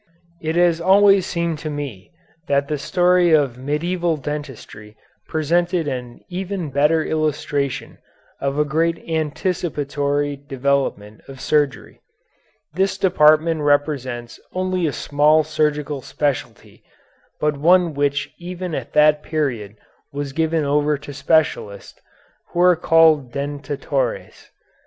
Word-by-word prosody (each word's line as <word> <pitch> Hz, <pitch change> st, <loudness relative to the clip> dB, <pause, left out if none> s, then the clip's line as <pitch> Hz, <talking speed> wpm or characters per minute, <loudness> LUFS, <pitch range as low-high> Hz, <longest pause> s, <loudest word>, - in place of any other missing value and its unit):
It 160 Hz, +1 st, -2 dB
has 170 Hz, -1 st, +3 dB
always 195 Hz, +1 st, +5 dB
seemed 170 Hz, -3 st, -2 dB
to 155 Hz, -, -5 dB
me 140 Hz, -, -6 dB, 0.4 s
that 140 Hz, 0 st, +1 dB
the 150 Hz, -1 st, -2 dB
story 180 Hz, 0 st, +3 dB
of 140 Hz, -5 st, +2 dB
Medieval 165 Hz, +4 st, -1 dB
Dentistry 135 Hz, -7 st, -8 dB, 0.3 s
presented 170 Hz, +2 st, 0 dB
an 125 Hz, -3 st, -5 dB
even 185 Hz, -3 st, -4 dB
better 150 Hz, +4 st, +2 dB
illustration 145 Hz, -3 st, -2 dB, 0.4 s
of 140 Hz, +1 st, -2 dB
a 150 Hz, -, +2 dB
great 165 Hz, +3 st, 0 dB
anticipatory 145 Hz, -3 st, -2 dB
development 135 Hz, -6 st, -2 dB
of 135 Hz, -1 st, -11 dB
surgery. 145 Hz, -1 st, -1 dB, 0.7 s
This 190 Hz, +2 st, 0 dB
department 155 Hz, -3 st, +3 dB
represents 140 Hz, -5 st, -1 dB
only 185 Hz, -2 st, -1 dB
a -, -, -1 dB
small 150 Hz, +3 st, +2 dB
surgical 150 Hz, -2 st, -1 dB
specialty, 145 Hz, +1 st, -4 dB, 0.6 s
but 150 Hz, -1 st, 0 dB
one 175 Hz, +2 st, +4 dB
which 145 Hz, 0 st, -1 dB
even 180 Hz, 0 st, -6 dB
at -, -, -5 dB
that 150 Hz, 0 st, +4 dB
period 125 Hz, -11 st, -3 dB, 0.4 s
was 140 Hz, -1 st, -5 dB
given 160 Hz, 0 st, 0 dB
over 145 Hz, +1 st, +1 dB
to 145 Hz, +1 st, -10 dB
specialists, 140 Hz, -8 st, -1 dB, 0.5 s
who 175 Hz, -, -4 dB
were 180 Hz, 0 st, +6 dB
called 160 Hz, -5 st, +4 dB
dentatores. 140 Hz, -1 st, -4 dB
150 Hz, 115 wpm, -20 LUFS, 140-165 Hz, 0.7 s, were